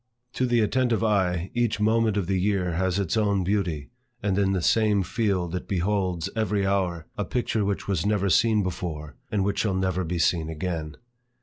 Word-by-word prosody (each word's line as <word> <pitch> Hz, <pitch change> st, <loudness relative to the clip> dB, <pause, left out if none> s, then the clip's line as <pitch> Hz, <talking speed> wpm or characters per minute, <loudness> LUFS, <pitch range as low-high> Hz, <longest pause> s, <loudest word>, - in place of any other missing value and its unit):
To 130 Hz, -, 0 dB
the 120 Hz, -1 st, +3 dB
attentive 120 Hz, +1 st, +1 dB
eye, 95 Hz, -4 st, +1 dB
each 120 Hz, -2 st, 0 dB
moment 110 Hz, 0 st, +2 dB
of 100 Hz, -, 0 dB
the 95 Hz, 0 st, 0 dB
year 95 Hz, -3 st, +1 dB
has 95 Hz, +2 st, 0 dB
its 100 Hz, +1 st, 0 dB
own 100 Hz, -3 st, +2 dB
beauty, 90 Hz, -7 st, -1 dB, 0.3 s
and 100 Hz, -2 st, +1 dB
in 100 Hz, -1 st, +2 dB
the 95 Hz, -2 st, 0 dB
same 105 Hz, -2 st, +3 dB
field, 95 Hz, -4 st, -1 dB
it 90 Hz, -, -4 dB
beholds, 95 Hz, -2 st, 0 dB
every 105 Hz, -3 st, 0 dB
hour, 90 Hz, -4 st, 0 dB
a -, -, +1 dB
picture 115 Hz, +1 st, -1 dB
which 100 Hz, 0 st, -2 dB
was 95 Hz, -5 st, 0 dB
never 100 Hz, -1 st, +1 dB
seen 110 Hz, +3 st, +3 dB
before, 80 Hz, -4 st, -5 dB, 0.2 s
and 105 Hz, -3 st, +1 dB
which 100 Hz, +1 st, -1 dB
shall 100 Hz, -4 st, +1 dB
never 95 Hz, -1 st, 0 dB
be 85 Hz, +1 st, -3 dB
seen 85 Hz, -1 st, +1 dB
again. 80 Hz, -2 st, -4 dB
95 Hz, 190 wpm, -25 LUFS, 90-105 Hz, 0.3 s, the